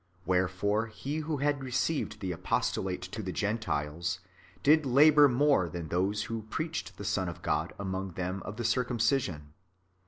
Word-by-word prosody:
Wherefore 95 Hz, +5 st, +1 dB
he 135 Hz, +7 st, -5 dB
who 155 Hz, -1 st, -2 dB
had 140 Hz, 0 st, 0 dB
received 130 Hz, -2 st, -1 dB
the 95 Hz, -2 st, -2 dB
apostolate 90 Hz, +2 st, -1 dB
to 95 Hz, +4 st, -5 dB
the 95 Hz, -3 st, -4 dB
Gentiles, 90 Hz, -5 st, -2 dB, 0.4 s
did 155 Hz, +2 st, +6 dB
labour 145 Hz, +2 st, +6 dB
more 130 Hz, -, +3 dB
than 85 Hz, -1 st, -6 dB
those 95 Hz, +5 st, 0 dB
who 110 Hz, -1 st, -5 dB
preached 160 Hz, +4 st, -4 dB
the 100 Hz, -, -7 dB
Son 95 Hz, -2 st, 0 dB
of 85 Hz, +1 st, -9 dB
God 80 Hz, +3 st, 0 dB
among 95 Hz, -2 st, -3 dB
them 90 Hz, +2 st, -3 dB
of 105 Hz, -, -7 dB
the 120 Hz, -, -3 dB
circumcision. 115 Hz, -, 0 dB
105 Hz, 155 wpm, -30 LUFS, 90-135 Hz, 0.4 s, did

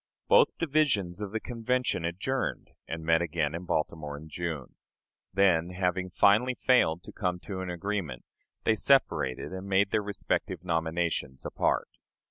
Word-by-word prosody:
Both 485 Hz, 0 st, +5 dB
divisions 135 Hz, -, +1 dB
of 100 Hz, -2 st, -4 dB
the 110 Hz, -, -1 dB
Convention 125 Hz, -5 st, -1 dB
adjourned, 105 Hz, +10 st, -2 dB, 0.2 s
and 80 Hz, 0 st, -5 dB
met 80 Hz, 0 st, +4 dB
again 80 Hz, -3 st, -1 dB
in 85 Hz, +2 st, -5 dB
Baltimore 75 Hz, -3 st, -2 dB
in 80 Hz, +2 st, -11 dB
June. 80 Hz, -4 st, -4 dB, 0.6 s
Then, 90 Hz, -3 st, +3 dB
having 90 Hz, 0 st, 0 dB
finally 105 Hz, +8 st, +4 dB
failed 85 Hz, -12 st, +3 dB
to -, -, -10 dB
come 90 Hz, -3 st, -2 dB
to 95 Hz, -2 st, -6 dB
an 95 Hz, -, -4 dB
agreement, 90 Hz, -7 st, -3 dB, 0.4 s
they 110 Hz, -, +4 dB
separated 90 Hz, -, +2 dB
and 95 Hz, +1 st, -6 dB
made 100 Hz, +1 st, +2 dB
their 110 Hz, -, +2 dB
respective 100 Hz, -3 st, -2 dB
nominations 80 Hz, -5 st, -1 dB
apart. -, -, 0 dB
90 Hz, 145 wpm, -29 LUFS, 80-105 Hz, 0.6 s, Both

